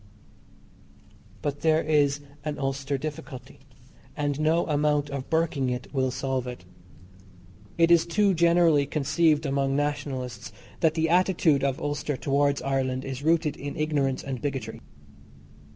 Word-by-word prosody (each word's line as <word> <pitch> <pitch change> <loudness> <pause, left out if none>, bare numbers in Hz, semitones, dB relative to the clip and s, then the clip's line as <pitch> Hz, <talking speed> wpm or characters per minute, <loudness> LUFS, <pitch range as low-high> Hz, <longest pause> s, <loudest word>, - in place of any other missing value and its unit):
But 145 -1 -3
there 160 0 +3
is 145 -2 +2 0.2
an 150 -1 -3
Ulster 135 0 -2
difficulty, 135 -2 -8 0.6
and 145 -1 -1
no 160 +2 +2
amount 150 -1 +1
of 140 -2 -5
burking 160 -5 0
it 125 +2 -5
will 130 -2 +1
solve 130 0 -2
it. 125 -7 -8 1.1
It 165 0 +4
is 170 -1 +5
too 200 +3 +2
generally 170 -4 +4
conceived 155 +1 +1
among 135 -1 0
Nationalists 140 -4 -3 0.3
that 160 -1 +2
the 160 0 +1
attitude 175 -5 +3
of 135 -1 0
Ulster 145 -1 -2
towards 140 +1 +1
Ireland 130 -1 -1
is 135 0 -5
rooted 160 0 +1
in 145 +2 -6
ignorance 150 -4 0
and 130 -3 -5
bigotry. 135 -5 -4
145 Hz, 135 wpm, -26 LUFS, 135-155 Hz, 1.1 s, is